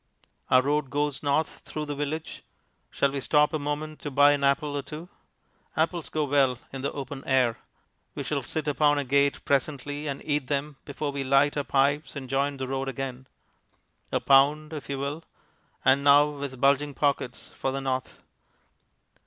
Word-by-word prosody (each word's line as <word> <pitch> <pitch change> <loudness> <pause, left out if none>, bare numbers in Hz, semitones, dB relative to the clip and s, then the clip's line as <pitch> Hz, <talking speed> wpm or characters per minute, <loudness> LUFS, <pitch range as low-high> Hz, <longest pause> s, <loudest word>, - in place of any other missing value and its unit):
Our 130 0 +5
road 145 0 0
goes 145 0 -1
north 145 +2 0
through 155 -1 -5
the 145 - -4
village 145 +2 -4 0.5
shall 140 - +1
we 140 - -3
stop 150 +3 +3
a 155 - 0
moment 150 +1 -4
to 145 - -4
buy 145 +1 +6
an 145 -1 0
apple 145 +1 +1
or 145 - -1
two? 155 +5 -9 0.7
Apples 165 +1 0
go 155 - -1
well 135 -3 +2 0.2
in 135 - -5
the 140 - -1
open 140 -1 -6
air; 130 -4 +2 0.6
we - - -3
shall - - -1
sit 155 -1 -4
upon 145 0 +3
a 145 - 0
gate 140 +1 +1
presently 145 +1 -1
and 140 -1 -3
eat 145 -3 0
them 145 0 -2
before 145 +1 -3
we 140 -1 -3
light 140 +2 +3
our 145 - 0
pipes 140 +1 +1
and 135 -2 -7
join 140 +1 0
the 130 -1 -4
road 135 +1 -2
again. 130 0 -5 0.8
A - - +1
pound, 150 +3 +4
if 150 -2 -7
you 140 - -2
will 140 +4 -4 0.6
and 140 +1 +4
now 145 +1 +6
with 140 -3 -6
bulging 140 +1 +2
pockets 140 -4 -1
for 135 - -2
the 135 - -2
north. 130 -1 -3
140 Hz, 180 wpm, -27 LUFS, 135-150 Hz, 0.8 s, buy